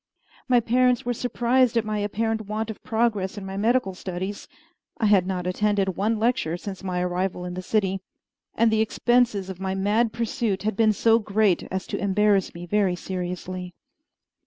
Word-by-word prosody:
My 250 -2 +5
parents 245 +1 +2
were 245 - 0
surprised 245 +1 +1
at 225 - +1
my 215 -1 -2
apparent 220 +1 -1
want 215 +1 -2
of 220 - -12
progress 220 -4 0
in 200 - -6
my 190 0 -6
medical 220 0 +1
studies 185 +2 -5 0.5
(I 225 - 0
had 200 -3 +4
not 180 -2 -2
attended 195 0 0
one 220 +3 0
lecture 220 -7 0
since 190 +1 -7
my 180 -2 -2
arrival 180 0 -2
in 180 - -5
the 185 - -4
city), 195 -1 0 0.5
and 230 0 +3
the 220 0 +3
expenses 230 -3 +2
of 190 -2 -7
my 190 0 -2
mad 210 +4 +1
pursuit 225 -3 -2
had 215 -1 -1
been 220 +1 +4
so 225 +2 +3
great 210 -3 +1
as 190 0 -3
to - - -4
embarrass 200 -1 +2
me 175 +1 -7
very 195 0 +1
seriously. 180 0 -5
205 Hz, 180 wpm, -25 LUFS, 190-225 Hz, 0.5 s, My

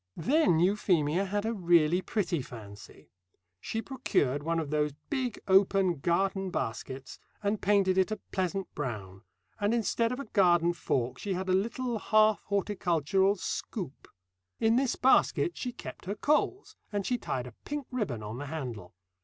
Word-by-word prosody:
Then 265 - +3
Euphemia 180 -2 +2
had 205 +2 -2
a 225 - 0
really 175 -3 +3
pretty 185 -7 -1
fancy. 105 -5 -12 0.5
She 225 - -3
procured 145 - 0
one 165 +2 -1
of 155 -3 -2
those 150 -1 +1 0.2
big 260 -5 -1
open 190 -3 +4
garden 190 +4 0
baskets 130 -1 -5 0.2
and 205 +1 0
painted 195 -2 +3
it 190 - +3
a 215 - -2
pleasant 190 0 -2
brown, 100 -9 -5 0.4
and 205 +3 +2
instead 230 0 +1
of 250 - -3
a 280 - -5
garden 175 -5 +3
fork 125 -6 -1
she 200 - -2
had 190 +1 -3
a - - +3
little 235 +4 0
half 215 +1 +4
horticultural 195 -1 +1
scoop. 185 - -5 0.5
In 225 +1 +3
this 260 0 +2
basket 265 +6 +3
she 250 - -4
kept - - -9
her 200 +3 -3
coals, 300 - 0 0.2
and 205 -2 -2
she 245 -1 0
tied 125 -10 -3
a 125 - -10
pink 290 -2 -4
ribbon 160 - -2
on 110 +4 -6
the 145 - -5
handle. 120 - -6
190 Hz, 160 wpm, -30 LUFS, 150-215 Hz, 0.5 s, open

